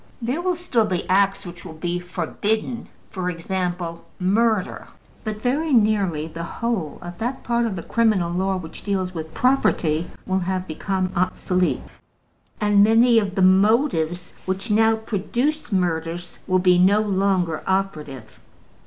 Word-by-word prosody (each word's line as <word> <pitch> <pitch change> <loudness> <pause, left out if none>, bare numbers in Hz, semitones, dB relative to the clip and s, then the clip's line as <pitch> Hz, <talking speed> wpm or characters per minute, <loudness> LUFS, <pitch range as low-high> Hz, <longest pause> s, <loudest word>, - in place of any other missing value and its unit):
There 250 +7 -2
will 365 0 0
still 260 -11 +1
be 185 -4 -2
acts 195 +1 +2
which 175 -1 -9
will 165 -3 -9
be 175 +2 -2
forbidden 215 +6 -3 0.2
for 185 -3 -2
example, 175 -1 -3
murder. 210 +2 +1 0.4
But 215 -1 -5
very 295 +6 0
nearly 200 -9 +2
the 165 +1 -7
whole 185 -3 -3
of 175 0 -8
that 245 +3 -3
part 235 0 +1
of 205 - -3
the 170 - -5
criminal 215 -7 +1
law 190 +1 0
which 165 -3 -8
deals 190 -2 -2
with 160 -2 -7
property 175 - +2 0.2
will 190 0 0
have 185 0 -2
become 185 +3 -2
obsolete, 180 0 0 0.8
and 205 -1 +4
many 230 +2 +5
of 195 -3 -3
the 190 - +2
motives 185 - +3
which 195 +4 -2
now 225 +1 +4
produce 235 +8 -2
murders 175 -2 -2
will 185 -1 +3
be 180 -1 +4
no 195 +3 +5
longer 190 -5 0
operative. 150 - -3
190 Hz, 145 wpm, -22 LUFS, 175-220 Hz, 0.8 s, many